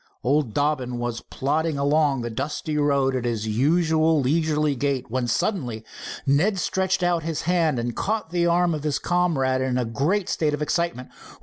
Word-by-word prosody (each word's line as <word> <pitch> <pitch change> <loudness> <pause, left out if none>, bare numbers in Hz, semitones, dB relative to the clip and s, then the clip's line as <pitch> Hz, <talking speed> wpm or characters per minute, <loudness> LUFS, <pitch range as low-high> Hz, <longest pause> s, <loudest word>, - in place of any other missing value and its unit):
Old 130 -3 +1
Dobbin 145 -4 0
was 120 -1 -3
plodding 155 +3 -1
along 140 -1 +2
the 120 0 -4
dusty 150 +5 -3
road 140 -3 +2
at 125 - -2
his 115 -3 -2
usual 160 +6 +2
leisurely 150 +1 +1
gait, 135 -3 -2
when 125 0 -1
suddenly 120 - -1 0.4
Ned 160 +9 +2
stretched 190 0 0
out 175 -1 +2
his 160 -1 -3
hand 165 -5 +1
and 120 0 -3
caught 215 -5 -2
the 175 -1 +1
arm 170 0 +2
of 155 - -3
his 150 -1 0
comrade 145 -8 +1
in 130 -1 0
a 125 - 0
great 155 - 0
state 150 -2 0
of 150 - -9
excitement. 160 -4 -2
150 Hz, 175 wpm, -24 LUFS, 130-165 Hz, 0.4 s, along